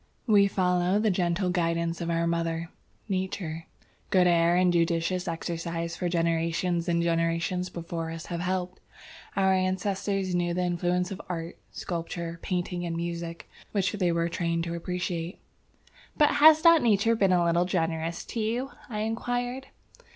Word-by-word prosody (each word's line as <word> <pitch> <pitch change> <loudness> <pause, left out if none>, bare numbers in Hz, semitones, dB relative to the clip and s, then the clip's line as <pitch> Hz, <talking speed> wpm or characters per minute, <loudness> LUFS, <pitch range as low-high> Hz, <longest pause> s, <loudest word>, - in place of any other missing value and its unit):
"We 205 -3 +5
follow 180 -1 +1
the 215 0 +2
gentle 180 0 0
guidance 170 -1 0
of 170 - -2
our 170 0 +1
mother, 165 0 -1 0.4
Nature. 185 -4 -3 0.4
Good 185 -2 +4
air 170 0 +4
and 180 0 +3
judicious 170 +2 +1
exercise 170 0 -3
for 175 0 -2
generations 170 +1 0
and 170 0 +2
generations 165 +2 0
before 165 -1 -5
us 165 0 -6
have 170 -1 -4
helped. 180 0 -2 0.6
Our 190 -1 +3
ancestors 190 0 -1
knew 175 -1 0
the 180 - 0
influence 180 +1 0
of 195 - -5
art, 170 -1 -5
sculpture, 170 -1 -5
painting 180 -1 -2
and 170 -1 -3
music, 170 0 -5 0.3
which 200 -2 +1
they 185 -5 +1
were 170 0 +1
trained 170 -1 -1
to 170 0 -3
appreciate." 175 0 -3 0.8
"But 295 -1 +5
has 310 +2 +7
not 335 -2 +7
nature 225 0 +3
been 195 -4 +3
a 175 -1 +3
little 170 +1 +2
generous 165 -2 -2
to 235 - -5
you?" 235 +5 -1 0.2
I 210 -3 -3
inquired. 245 +4 -2
175 Hz, 150 wpm, -27 LUFS, 170-190 Hz, 0.8 s, has